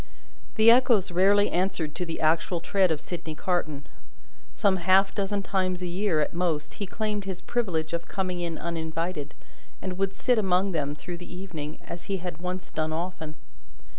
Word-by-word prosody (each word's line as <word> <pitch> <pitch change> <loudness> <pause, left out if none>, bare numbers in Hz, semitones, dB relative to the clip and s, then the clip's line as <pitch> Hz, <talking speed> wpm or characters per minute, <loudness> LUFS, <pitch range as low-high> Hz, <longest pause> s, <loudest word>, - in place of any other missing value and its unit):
The 220 0 +8
Echoes 235 -6 +4
rarely 200 +3 +4
answered 180 -4 0
to 180 - -3
the 165 - -4
actual 165 +2 +2
tread 190 +2 +2
of 160 -2 0
Sydney 160 -1 -5
Carton. 155 -5 -1 0.7
Some 200 -3 +2
half 190 +2 +4
dozen 200 0 -1
times 185 -2 0
a - - -1
year, 175 -2 +1
at - - -1
most, 170 -4 -1
he 200 - -1
claimed 210 0 -2
his 190 -2 -4
privilege 170 -9 -1
of 170 - -2
coming 185 -2 -2
in 170 -2 -2
uninvited, 165 -2 -3 0.4
and 185 -1 -5
would 195 0 0
sit 245 -3 +3
among 190 -1 +2
them 145 -4 -1
through 175 +4 -6
the 175 - -10
evening, 170 -5 -6
as 170 - -7
he 195 -1 -1
had 175 -2 -6
once 180 +1 -4
done 155 0 -1
often. 160 -2 -4
180 Hz, 175 wpm, -27 LUFS, 165-195 Hz, 0.7 s, The